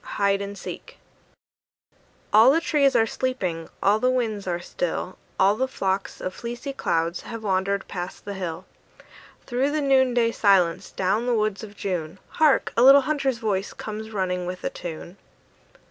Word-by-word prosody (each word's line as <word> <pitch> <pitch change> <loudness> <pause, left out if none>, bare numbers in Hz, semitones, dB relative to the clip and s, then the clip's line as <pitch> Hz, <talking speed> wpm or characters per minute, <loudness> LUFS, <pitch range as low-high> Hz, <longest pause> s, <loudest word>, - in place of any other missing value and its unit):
HIDE 200 0 +2
AND 200 0 -6
SEEK - - -8 1.4
All 220 +4 +8
the 300 +4 +4
trees 290 -4 +2
are 225 - +5
sleeping, 190 -10 -3
all 205 +2 +4
the 255 - +2
winds 225 -6 -1
are 175 -1 -1
still, - - -3 0.2
All 195 +2 +5
the 260 +4 0
flocks 195 -6 -2
of 185 - -4
fleecy 240 +6 -6
clouds 165 -8 -1
have 230 -1 -8
wandered 195 0 0
past 180 -1 -6
the 200 - -4
hill; 185 -2 -5 0.8
Through 255 +3 0
the 305 +1 -1
noonday 260 -4 +3
silence, 190 -7 +2
down 205 +6 0
the 245 - +2
woods 215 -1 -1
of 210 -1 -10
June, 180 -4 -3
Hark! 305 -3 +2
a 230 - +3
little 275 +2 +9
hunter's 275 -3 0
voice 205 -3 -2
comes 220 0 -6
running 180 -4 -2
with 180 0 -6
a - - -2
tune. 175 +2 -8
210 Hz, 160 wpm, -24 LUFS, 185-255 Hz, 1.4 s, little